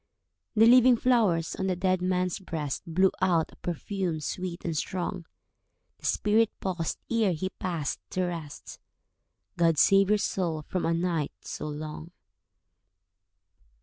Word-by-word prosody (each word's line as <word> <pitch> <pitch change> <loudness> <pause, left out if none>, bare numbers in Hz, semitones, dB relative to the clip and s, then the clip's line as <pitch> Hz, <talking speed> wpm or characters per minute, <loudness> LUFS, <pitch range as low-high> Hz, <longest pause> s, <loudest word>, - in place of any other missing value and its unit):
The 220 +1 +6
living 250 +1 +7
flowers 215 -10 +2
on 190 - -1
the 185 - +1
dead 185 0 +1
man's 180 0 0
breast 155 -7 -4
Blew 185 +3 +3
out 170 -4 +2
a - - -17
perfume 175 -1 -3
sweet 175 +3 -5
and 165 -2 -2
strong. 175 +1 -3 0.7
The - - -4
spirit 215 +1 +3
paused 175 -4 -2
ere 220 -5 +2
he 185 +4 -3
passed 170 -6 -2
to 185 - -1
rest— 165 -5 -6 0.8
"God 165 -2 +3
save 195 +5 +5
your 210 - +4
soul 170 -6 -2
from 180 +3 -2
a 165 - +2
night 165 -4 -1
so 150 - -5
long." 155 +2 -6
180 Hz, 140 wpm, -28 LUFS, 165-195 Hz, 0.8 s, living